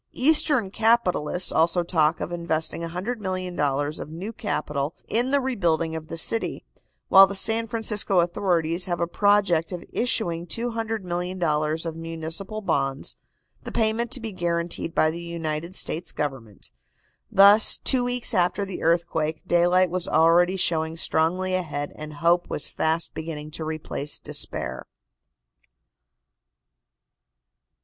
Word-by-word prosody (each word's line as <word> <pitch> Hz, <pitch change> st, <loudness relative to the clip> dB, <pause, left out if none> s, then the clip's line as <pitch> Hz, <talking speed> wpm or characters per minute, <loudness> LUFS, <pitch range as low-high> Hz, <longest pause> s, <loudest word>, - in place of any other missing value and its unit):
Eastern 275 Hz, -6 st, +3 dB
capitalists 210 Hz, -7 st, +1 dB
also 170 Hz, +2 st, +2 dB
talk 160 Hz, -2 st, +1 dB
of -, -, -4 dB
investing 165 Hz, -2 st, -1 dB
$100,000,000 180 Hz, -, -2 dB
of -, -, -7 dB
new 185 Hz, +8 st, -6 dB
capital 150 Hz, -8 st, -3 dB
in 240 Hz, +3 st, +2 dB
the 280 Hz, +1 st, +3 dB
rebuilding 170 Hz, -, 0 dB
of 160 Hz, -1 st, -6 dB
the 165 Hz, -, -6 dB
city, 225 Hz, +7 st, +1 dB, 0.4 s
while 195 Hz, 0 st, +9 dB
the 200 Hz, -, -6 dB
San 225 Hz, +3 st, 0 dB
Francisco 210 Hz, -3 st, +1 dB
authorities 175 Hz, -1 st, +1 dB
have 175 Hz, -1 st, -2 dB
a 170 Hz, -, +1 dB
project 190 Hz, -2 st, +2 dB
of 180 Hz, -2 st, -6 dB
issuing 175 Hz, -8 st, -1 dB
$200,000,000 180 Hz, -8 st, -2 dB
of 165 Hz, -1 st, -4 dB
municipal 165 Hz, +6 st, -4 dB
bonds, 135 Hz, -7 st, -1 dB, 0.5 s
the -, -, -7 dB
payment 225 Hz, +1 st, 0 dB
to 255 Hz, -, -2 dB
be 225 Hz, -2 st, -6 dB
guaranteed 170 Hz, -2 st, -3 dB
by 155 Hz, -, +3 dB
the 170 Hz, +2 st, -6 dB
United 170 Hz, 0 st, -4 dB
States 170 Hz, -1 st, -1 dB
Government. 130 Hz, -9 st, -5 dB, 0.6 s
Thus, 200 Hz, +2 st, +6 dB
two 255 Hz, -2 st, +2 dB
weeks 245 Hz, 0 st, 0 dB
after 180 Hz, +3 st, +1 dB
the 190 Hz, -2 st, -6 dB
earthquake, 160 Hz, -2 st, 0 dB
daylight 175 Hz, +1 st, +3 dB
was 180 Hz, -1 st, -1 dB
already 170 Hz, +4 st, +4 dB
showing 160 Hz, -2 st, 0 dB
strongly 180 Hz, +4 st, 0 dB
ahead 150 Hz, -6 st, -2 dB
and 155 Hz, 0 st, -8 dB
hope 170 Hz, +3 st, +2 dB
was -, -, -4 dB
fast 160 Hz, +1 st, -1 dB
beginning 155 Hz, -1 st, -6 dB
to 160 Hz, -, -4 dB
replace 155 Hz, -2 st, -4 dB
despair. -, -, -3 dB
175 Hz, 130 wpm, -24 LUFS, 160-200 Hz, 0.6 s, while